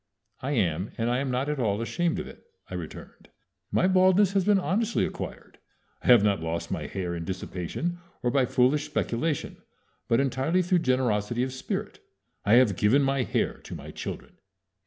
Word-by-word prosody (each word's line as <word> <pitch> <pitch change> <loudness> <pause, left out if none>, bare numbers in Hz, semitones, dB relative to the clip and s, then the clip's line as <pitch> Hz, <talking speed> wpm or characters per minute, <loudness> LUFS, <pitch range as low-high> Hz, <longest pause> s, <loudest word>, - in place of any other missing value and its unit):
"I 140 +3 -2
am, 95 - 0
and 115 +1 0
I 125 - +1
am 135 0 -2
not 130 +2 -1
at 150 -1 -2
all 105 -4 +1
ashamed 165 +8 -1
of - - -4
it," - - -12 0.3
I - - -10
returned. - - -8 0.4
"My - - +3
baldness 190 +1 +4
has 195 -1 +3
been 205 +1 +4
honestly 210 +5 +1
acquired. - - -7 0.4
I - - -7
have 120 -5 +7
not 100 -5 +2
lost 80 +1 -3
my - - -3
hair 90 -3 -3
in 85 -1 -4
dissipation, 95 - -4 0.2
or 120 - +2
by 135 -1 +3
foolish 130 +5 +2
speculation, 150 0 -2 0.5
but 115 +1 +3
entirely 135 +7 +1
through 180 0 +2
generosity 120 -4 +1
of 130 0 -3
spirit. 130 - -4 0.5
_I 110 +4 +7
have 110 -8 +4
given 125 +7 +4
my 135 0 +1
hair 125 - -1
to - - -9
my - - -8
children. - - -7
130 Hz, 180 wpm, -27 LUFS, 105-165 Hz, 0.5 s, have